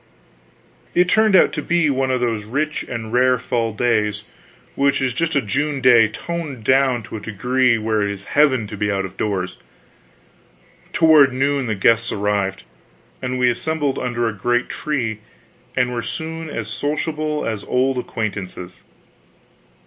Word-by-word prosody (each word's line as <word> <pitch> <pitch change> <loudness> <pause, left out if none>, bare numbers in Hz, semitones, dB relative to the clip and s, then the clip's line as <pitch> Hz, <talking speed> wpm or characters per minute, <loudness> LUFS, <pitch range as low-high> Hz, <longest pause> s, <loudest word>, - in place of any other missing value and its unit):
It 180 +1 +4
turned 220 -1 +4
out - - +5
to 150 - -2
be 165 -1 +2
one 135 0 0
of 130 -1 0
those 115 -3 -1
rich 145 +8 -2
and 115 -2 -6
rare 125 +1 +4
fall 115 -2 -1
days 105 -2 0 0.5
which 140 0 +2
is 130 -2 0
just 165 +5 -1
a 140 - +2
June 145 +7 -1
day 120 -3 +6
toned 145 +2 -6
down 130 -1 +2
to 110 - -7
a - - -9
degree 125 +4 +1
where 110 -1 0
it 100 - 0
is 100 -1 -6
heaven 130 -1 +2
to 105 - -7
be 105 0 -1
out 95 -1 -1
of 95 - -9
doors. 95 -3 -2 1.3
Toward 155 -4 +6
noon 140 0 0
the 110 - -1
guests 115 +3 +2
arrived, 100 -2 -1 0.6
and 130 0 -2
we 125 0 +3
assembled 145 +2 -2
under 120 -2 -1
a 115 - -2
great 120 +4 0
tree 120 -8 -2 0.6
and 125 -1 +2
were 120 - -2
soon 160 +4 -5
as 115 -7 -4
sociable 150 - -2
as 110 -3 -3
old 130 0 +1
acquaintances. 95 -6 -5
125 Hz, 160 wpm, -20 LUFS, 110-140 Hz, 1.3 s, day